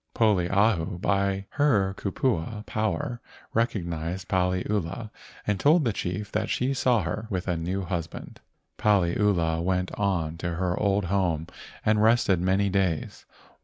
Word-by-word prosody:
Poliahu 100 -4 +2
by 100 0 0
her 105 -10 +2
kupua 105 - -2
power 120 +3 -2 0.3
recognized 90 -5 -2
Paliula, 95 +3 -1 0.3
and 105 -2 0
told 155 - +4
the 115 - +1
chief 95 +3 -4
that - - -1
she 130 +2 0
saw 125 -5 +2
her 105 +6 -4
with 95 -2 -3
a 90 - +1
new 90 +4 -2
husband. 85 -3 -5 0.4
Paliula 90 -4 +2
went 90 0 0
on 85 -5 0
to 85 0 -2
her 90 0 0
old 100 -1 +1
home 85 -4 0 0.4
and 105 0 +3
rested 110 -5 +4
many 95 +2 +2
days. 95 -5 -1
95 Hz, 130 wpm, -26 LUFS, 90-105 Hz, 0.4 s, told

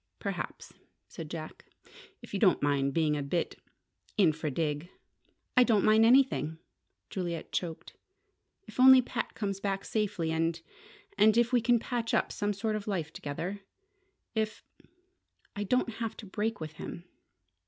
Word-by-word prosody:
"Perhaps," - - -5 0.3
said - - -8
Jack. - - -7 0.6
"If - - -12
you 200 - -1
don't 190 -8 +4
mind 140 -1 +2
being 155 -1 +2
a 145 - -2
bit 160 +5 -2 0.6
infra 160 -5 +2
dig." 150 +3 -2 0.7
"I 250 - +7
don't 220 -5 +3
mind 220 +1 +6
anything," 245 - +3 0.5
Juliet 170 -4 -4
choked, 165 -3 -4 0.7
"if - - -12
only 260 0 +9
Pat - - -4
comes 200 -2 -2
back 195 -1 -2
safely 205 -7 -1
and 165 +1 0 0.6
and 215 +2 +6
if 235 +1 +3
we 245 - +5
can 240 +1 +4
patch 230 0 -2
up - - +1
some 205 0 -1
sort 215 +2 -1
of 210 0 -5
a - - -1
life 165 -5 -2
together. 170 +8 -4 0.7
If 220 -1 -2 0.9
I 205 - -2
don't 250 +4 +1
have 225 0 -4
to - - -9
break 210 +3 -2
with 155 -1 -7
him." 170 - -7
200 Hz, 155 wpm, -30 LUFS, 160-225 Hz, 0.9 s, only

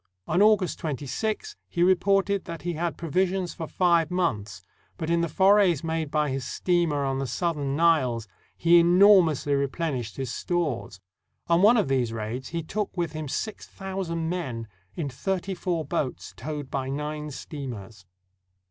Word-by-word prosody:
On 175 +5 +1
August 210 -4 +3
26, 190 - -3
he 175 - +1
reported 195 +2 +2
that 165 -1 -7
he 175 0 -2
had 170 +1 -2
provisions 180 +2 0
for 165 -3 -6
five 170 -3 +2
months, 105 - -2 0.3
but 160 0 -3
in 170 0 +3
the 170 - -1
forays 190 -2 +4
made 160 -2 -2
by 150 -1 0
his 135 0 -2
steamer 165 -1 0
on 135 0 -1
the 135 - -2
Southern 145 0 -1
Niles 135 -9 +2 0.3
he 170 +1 +6
enormously 175 -4 +5
replenished 140 - -2
his 130 -3 -3
stores. 155 - -2 0.5
On 170 +1 +3
one 220 +5 +6
of 210 - +2
these 130 -4 +1
raids 115 +4 -4
he 165 0 -3
took 200 +3 -4
with 170 -3 -1
him 155 -1 -5
six 215 +10 -4
thou 195 0 -5
sand 165 -2 -2
men 130 -11 -3 0.3
in 160 - -2
thirty 190 +8 -2
four 175 -4 -2
boats 130 -4 -3
towed 150 -3 -6
by 135 -1 -2
nine 150 +2 -4
steamers. 115 - -8
165 Hz, 160 wpm, -26 LUFS, 135-180 Hz, 0.5 s, he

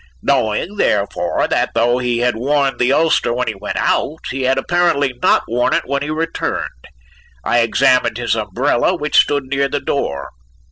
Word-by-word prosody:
Knowing, 110 - 0
therefore, 105 - 0
that - - 0
though 120 +2 +2
he 120 -1 -1
had 125 -1 +1
worn 135 +2 0
the 125 +1 +2
ulster 155 -4 +2
when 125 +1 -1
he 110 - -1
went 100 +1 -5
out, 155 - 0
he 135 - -4
had 130 +1 +1
apparently 145 -3 +1
not - - +3
worn 120 +2 +1
it - - -1
when 140 +2 -2
he 145 - -4
returned, 155 - -4 0.6
I 120 - +2
examined 120 0 +2
his 120 -1 -1
umbrella, 110 - 0
which 150 -3 -3
stood 145 -1 +3
near 140 +1 -1
the 145 - -1
door. 70 - -3
130 Hz, 175 wpm, -17 LUFS, 120-145 Hz, 0.6 s, not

